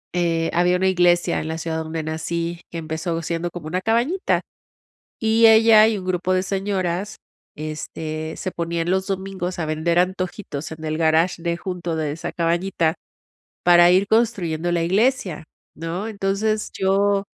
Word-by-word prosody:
eh, 165 Hz, -2 st, +1 dB
había 180 Hz, +1 st, +3 dB
una 190 Hz, +1 st, +1 dB
iglesia 175 Hz, -1 st, +3 dB
en 155 Hz, -, -5 dB
la 160 Hz, -, -3 dB
ciudad 160 Hz, 0 st, -3 dB
donde 160 Hz, 0 st, -4 dB
nací 170 Hz, +2 st, -3 dB
que 170 Hz, -, -7 dB
empezó 160 Hz, +1 st, -3 dB
siendo 170 Hz, +1 st, -2 dB
como 170 Hz, -2 st, -9 dB
una 180 Hz, +3 st, -2 dB
cabañita. 240 Hz, -, +1 dB, 0.8 s
Y 225 Hz, +1 st, +4 dB
ella, 220 Hz, -1 st, +7 dB
y 220 Hz, -, +1 dB
un 190 Hz, -, -6 dB
grupo 185 Hz, 0 st, -1 dB
de 185 Hz, -, +2 dB
señoras, 195 Hz, 0 st, -2 dB, 0.4 s
este, 155 Hz, +1 st, -5 dB
se 185 Hz, -, -4 dB
ponían 170 Hz, 0 st, -2 dB
los 190 Hz, 0 st, +1 dB
domingos 190 Hz, -2 st, -4 dB
a 160 Hz, -, -1 dB
vender 160 Hz, +3 st, +1 dB
antojitos 180 Hz, -4 st, -3 dB
en 160 Hz, 0 st, -9 dB
el 155 Hz, +1 st, -2 dB
garaje 165 Hz, +2 st, +2 dB
de 170 Hz, -1 st, -1 dB
junto, 175 Hz, -2 st, -4 dB
de 155 Hz, -2 st, -1 dB
esa 160 Hz, -, -5 dB
cabañita, 170 Hz, -1 st, 0 dB, 0.7 s
para 175 Hz, 0 st, +7 dB
ir 190 Hz, +2 st, +4 dB
construyendo 185 Hz, -8 st, +1 dB
la 170 Hz, -1 st, +1 dB
iglesia, 195 Hz, -, +1 dB, 0.3 s
¿no? 170 Hz, +6 st, -4 dB
Entonces 210 Hz, +1 st, -1 dB
yo, 195 Hz, +1 st, +2 dB
175 Hz, 160 wpm, -22 LUFS, 165-195 Hz, 0.8 s, ella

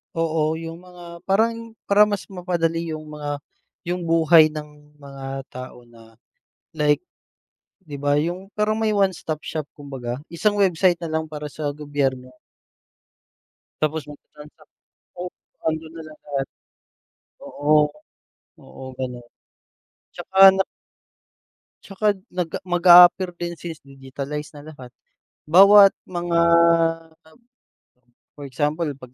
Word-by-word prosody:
Oo, 160 Hz, -1 st, 0 dB
yung 165 Hz, 0 st, -7 dB
mga 175 Hz, -1 st, -13 dB
parang 230 Hz, +3 st, 0 dB, 0.2 s
para 205 Hz, +1 st, +6 dB
mas 205 Hz, -2 st, -4 dB
mapadali 170 Hz, -3 st, -2 dB
yung 155 Hz, 0 st, -8 dB
mga 145 Hz, -1 st, -5 dB, 0.4 s
yung 175 Hz, 0 st, -4 dB
buhay 165 Hz, -1 st, +5 dB
ng 150 Hz, -1 st, -11 dB
mga 135 Hz, -1 st, -7 dB
tao 125 Hz, -1 st, -10 dB
na, 115 Hz, -1 st, -18 dB, 0.6 s
like. 150 Hz, 0 st, +1 dB, 0.8 s
Di 145 Hz, -4 st, -9 dB
ba 145 Hz, 0 st, +1 dB
yung 175 Hz, +6 st, -2 dB
parang 215 Hz, +1 st, 0 dB
may 220 Hz, -1 st, +1 dB
one 195 Hz, -1 st, +3 dB
stop 155 Hz, -3 st, -6 dB
shop 155 Hz, -2 st, -5 dB
kumbaga, 135 Hz, -5 st, -6 dB, 0.2 s
isang 205 Hz, +5 st, 0 dB
website 185 Hz, -2 st, +3 dB
nalang 160 Hz, -1 st, -3 dB
para 150 Hz, -1 st, -6 dB
sa 150 Hz, -2 st, -4 dB
gobyerno. 140 Hz, -3 st, -3 dB, 1.5 s
Tapos 155 Hz, +1 st, 0 dB
magta-transact, 150 Hz, +1 st, -16 dB, 0.4 s
oo 175 Hz, -, -5 dB, 0.4 s
andun 160 Hz, 0 st, -3 dB
na 165 Hz, -, -8 dB
lahat. 145 Hz, -3 st, -5 dB, 1.0 s
Oo. 145 Hz, +1 st, 0 dB, 0.9 s
Oo, -, -, -13 dB
ganun 125 Hz, -2 st, -6 dB, 0.9 s
tsaka 195 Hz, 0 st, +6 dB
na 190 Hz, -, +1 dB, 1.2 s
Tsaka 195 Hz, +2 st, -7 dB, 0.3 s
nag 180 Hz, -2 st, -2 dB, 0.2 s
mag-aapear 175 Hz, +1 st, +7 dB
din 170 Hz, 0 st, -4 dB
since 165 Hz, -2 st, -8 dB
digitalize 140 Hz, +2 st, -7 dB
na 145 Hz, -, -11 dB
lahat, 130 Hz, -5 st, -12 dB, 0.5 s
bawat 195 Hz, +4 st, +7 dB, 0.2 s
mga 175 Hz, -1 st, -1 dB, 2.0 s
for 145 Hz, -, -10 dB
example 150 Hz, +4 st, -1 dB
'pag 125 Hz, -2 st, -14 dB
160 Hz, 115 wpm, -22 LUFS, 145-180 Hz, 2.0 s, mag-aapear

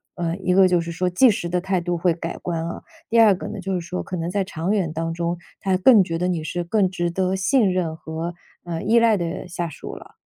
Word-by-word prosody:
嗯， 170 Hz, 0 st, -2 dB
一 180 Hz, -, +3 dB
个 190 Hz, 0 st, +6 dB
就 180 Hz, -1 st, +2 dB
是 170 Hz, 0 st, -5 dB
说 180 Hz, +2 st, -1 dB
即 240 Hz, +9 st, +5 dB
时 200 Hz, -5 st, -1 dB
的 180 Hz, 0 st, 0 dB
态 190 Hz, -1 st, 0 dB
度 175 Hz, 0 st, -1 dB
会 175 Hz, 0 st, +2 dB
改 165 Hz, 0 st, -5 dB
观 165 Hz, -2 st, -3 dB
啊， 170 Hz, -, -6 dB, 0.3 s
第 230 Hz, -, +3 dB
二 220 Hz, -3 st, +7 dB
个 -, -, -7 dB
呢， -, -, -6 dB
就 190 Hz, +1 st, -3 dB
是 180 Hz, -, -1 dB
说 175 Hz, +2 st, -4 dB
可 185 Hz, -, -5 dB
能 165 Hz, 0 st, -3 dB
在 200 Hz, +2 st, 0 dB
长 175 Hz, 0 st, -3 dB
远 190 Hz, -7 st, 0 dB
当 165 Hz, +1 st, -2 dB
中， 170 Hz, +1 st, -2 dB, 0.2 s
他 190 Hz, -1 st, +1 dB
更 210 Hz, +1 st, +6 dB
觉 165 Hz, -2 st, -3 dB
得 180 Hz, -, 0 dB
你 175 Hz, -3 st, -1 dB
是 175 Hz, +2 st, -3 dB
更 190 Hz, +2 st, +1 dB
值 175 Hz, -1 st, -2 dB
得 185 Hz, +2 st, 0 dB
信 195 Hz, +2 st, +2 dB
任 175 Hz, -3 st, -1 dB
和， 160 Hz, +2 st, -5 dB, 0.3 s
嗯， 165 Hz, -2 st, -4 dB
依 230 Hz, +1 st, +5 dB
赖 230 Hz, -2 st, +4 dB
的 170 Hz, -1 st, -4 dB
下 175 Hz, -1 st, -4 dB
属 155 Hz, -, -8 dB
了。 -, -, -13 dB
180 Hz, 280 characters per minute, -22 LUFS, 170-190 Hz, 0.3 s, 二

